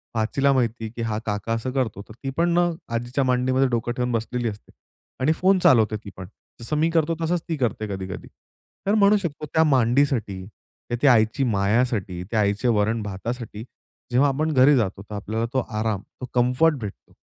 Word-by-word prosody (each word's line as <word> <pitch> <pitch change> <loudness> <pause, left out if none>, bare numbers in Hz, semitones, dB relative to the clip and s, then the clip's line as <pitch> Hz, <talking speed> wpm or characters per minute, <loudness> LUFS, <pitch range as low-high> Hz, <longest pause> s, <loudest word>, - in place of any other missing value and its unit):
भाचीला 135 +6 +2
माहिती 120 -3 0
आहे, 110 - -6
की 120 - -5
हा 110 -1 -2
काका 105 +2 -2
असं 115 +3 -2
करतो. 125 -7 -2
तर - - -10
ती 135 - -2
पण 170 0 +2
अ, 175 - +3 0.3
आजीच्या 120 +4 -1
मांडीमध्ये 130 +1 +2
डोकं 120 -1 -1
ठेवून 125 0 0
बसलेली 115 +1 -1
असते. 105 0 -11 0.5
आणि 150 +4 +3
फोन 190 +2 +3
चालवते 110 -8 +4
ती - - -6
पण. 95 -1 -7 0.3
जसं 135 +6 -3
मी 160 +2 +2
करतो 165 0 +1
तसंच 170 +1 0
ती 160 - -1
करते 110 -4 -1
कधी-कधी. 95 0 -6 0.6
तर 205 - +3
म्हणू 210 0 +5
शकतो 160 -6 -4
त्या 160 - +5
मांडीसाठी, 125 -7 +1 0.6
ती 145 - +4
आईची 115 +1 +4
मायासाठी, 100 -4 0
त्या 110 - +1
आईचे 100 +4 0
वरण 110 +2 0
भातासाठी. 110 +2 -5 0.5
जेव्हा 135 +4 +4
आपण 155 +4 0
घरी 135 +2 +6
जातो 100 -5 -1
तर 105 0 -8
आपल्याला 110 +3 -2
तो 130 - +2 0.2
आराम 110 -3 -1 0.2
तो - - -3
कम्फर्ट 125 +6 +3
भेटतो. 105 -2 -8
120 Hz, 185 wpm, -23 LUFS, 110-140 Hz, 0.6 s, घरी